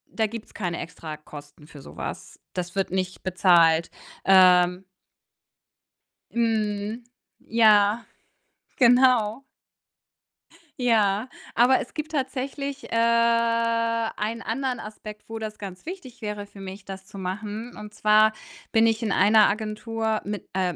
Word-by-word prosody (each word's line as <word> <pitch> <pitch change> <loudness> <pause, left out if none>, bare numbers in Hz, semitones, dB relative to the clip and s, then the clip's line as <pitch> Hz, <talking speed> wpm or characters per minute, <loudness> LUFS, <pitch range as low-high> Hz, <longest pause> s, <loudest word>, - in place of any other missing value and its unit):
da 220 -1 +1
gibt's 230 +1 -9
keine 175 -4 -3
Extrakosten 150 -3 -10
für 150 -2 -13
so - - -13
was. - - -7
Das 180 0 -5
wird 195 -2 -1
nicht 185 -1 -3
bezahlt, 170 -3 +4 0.4
ähm 180 -1 +5 1.5
Mhm, 220 -1 -1 0.4
ja, 215 -1 +4 0.7
genau. 245 -2 +4 1.4
Ja, 220 -2 +2 0.3
aber 250 +2 +4
es - - -9
gibt 310 -1 -5
tatsächlich, 275 0 -3
äh, - - -1
einen 230 -1 +1
anderen 255 +2 -2
Aspekt, 210 0 -9
wo 225 - -5
das 215 -1 -6
ganz 190 +1 -9
wichtig 300 -9 -9
wäre 210 -1 -4
für 200 - -15
mich, 195 +1 -9
das 190 -1 -8
zu 205 - -12
machen, 210 +5 -5
und 210 0 -9
zwar 215 +1 +4 0.4
bin 225 0 +4
ich 225 +1 0
in 215 - -1
einer 215 +2 +5
Agentur 220 +1 -2
mit 205 0 -6
äh, 185 -2 0
215 Hz, 125 wpm, -25 LUFS, 190-230 Hz, 1.5 s, ähm